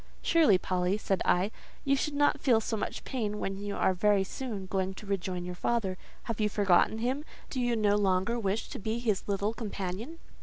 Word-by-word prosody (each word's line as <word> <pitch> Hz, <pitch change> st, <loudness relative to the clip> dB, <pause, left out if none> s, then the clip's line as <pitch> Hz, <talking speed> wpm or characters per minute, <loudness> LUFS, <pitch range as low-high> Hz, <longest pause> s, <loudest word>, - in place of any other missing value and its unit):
"Surely, 310 Hz, -, +5 dB
Polly," 180 Hz, +2 st, 0 dB
said 195 Hz, -3 st, -1 dB
I, 185 Hz, +4 st, +2 dB, 0.3 s
"you 275 Hz, 0 st, +4 dB
should 285 Hz, +1 st, -1 dB
not 290 Hz, 0 st, +3 dB
feel 240 Hz, -5 st, +4 dB
so 225 Hz, 0 st, -2 dB
much 215 Hz, -, -4 dB
pain 215 Hz, -6 st, -2 dB
when 195 Hz, -1 st, -3 dB
you 205 Hz, 0 st, -4 dB
are 190 Hz, -, +2 dB
very 200 Hz, +1 st, +3 dB
soon 210 Hz, -1 st, -5 dB
going 190 Hz, 0 st, -1 dB
to 210 Hz, -, -10 dB
rejoin 185 Hz, -2 st, -2 dB
your 180 Hz, -, -4 dB
father. 195 Hz, 0 st, 0 dB, 0.3 s
Have 230 Hz, -2 st, -4 dB
you 210 Hz, -, +3 dB
forgotten 200 Hz, +1 st, +3 dB
him? 255 Hz, +6 st, -1 dB, 0.3 s
Do 260 Hz, -, -1 dB
you 245 Hz, -1 st, +1 dB
no 210 Hz, -2 st, +3 dB
longer 195 Hz, +3 st, +1 dB
wish 200 Hz, 0 st, -1 dB
to -, -, -6 dB
be 220 Hz, +3 st, -2 dB
his 220 Hz, -5 st, 0 dB
little 200 Hz, +2 st, 0 dB
companion?" 215 Hz, -, -5 dB
205 Hz, 200 wpm, -30 LUFS, 190-235 Hz, 0.3 s, Surely